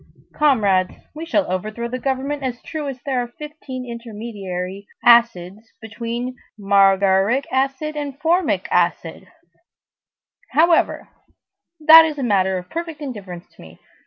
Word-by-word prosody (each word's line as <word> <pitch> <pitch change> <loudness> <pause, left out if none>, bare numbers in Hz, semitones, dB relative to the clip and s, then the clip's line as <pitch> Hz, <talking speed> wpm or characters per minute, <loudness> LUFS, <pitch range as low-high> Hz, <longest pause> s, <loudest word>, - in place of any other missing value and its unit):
Comrades, 205 -11 +2 0.2
we 320 +2 -7
shall 305 -3 +1
overthrow 215 +5 -4
the 250 +2 -5
government 270 +3 -2
as 250 -3 -4
true 310 -2 -5
as 265 -2 -6
there 260 -3 0
are 240 - -4
fifteen 295 -4 -8
intermediary 205 -5 -7 0.2
acids 220 -3 +3
between 235 +3 -5 0.2
margaric 195 +4 +3
acid 275 +3 -1
and 285 -2 -5
formic 345 +4 +1
acid; - - -1 1.3
however, 330 +2 +2 0.7
that 320 +1 +9
is 310 -2 -3
a 275 - -3
matter 190 -4 +1
of 180 0 -8
perfect 330 - -6
indifference 200 - -8
to - - -18
me. 80 0 -14
240 Hz, 130 wpm, -20 LUFS, 200-290 Hz, 1.3 s, that